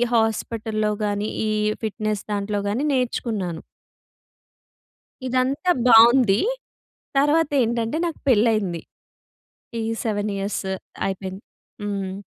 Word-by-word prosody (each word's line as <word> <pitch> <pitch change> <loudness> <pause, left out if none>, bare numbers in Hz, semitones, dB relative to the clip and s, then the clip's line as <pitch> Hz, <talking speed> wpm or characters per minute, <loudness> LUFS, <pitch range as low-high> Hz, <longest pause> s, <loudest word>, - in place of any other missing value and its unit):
హాస్పటల్‍లో 220 -1 0
గానీ, 205 +1 -1 0.2
ఈ - - 0 0.3
ఫిట్‍నెస్ 215 -1 -2
దాంట్లో 205 0 -1
గానీ 240 +8 -1
నేర్చుకున్నాను. 220 -9 -2 1.7
ఇదంతా 260 +7 +1 0.2
బావుంది. 230 -2 +7 0.8
తర్వాతేంటంటే, 275 -5 +2
నాకు 330 - -6
పెళ్ళైంది. 215 -7 +2 1.0
ఈ - - -2 0.2
7 210 -1 -1
ఇయర్స్ 200 +1 -2 0.4
అయిపోయింది. 190 0 -5 0.4
హ్మ్. 200 -2 -3
215 Hz, 85 wpm, -23 LUFS, 205-245 Hz, 1.7 s, బావుంది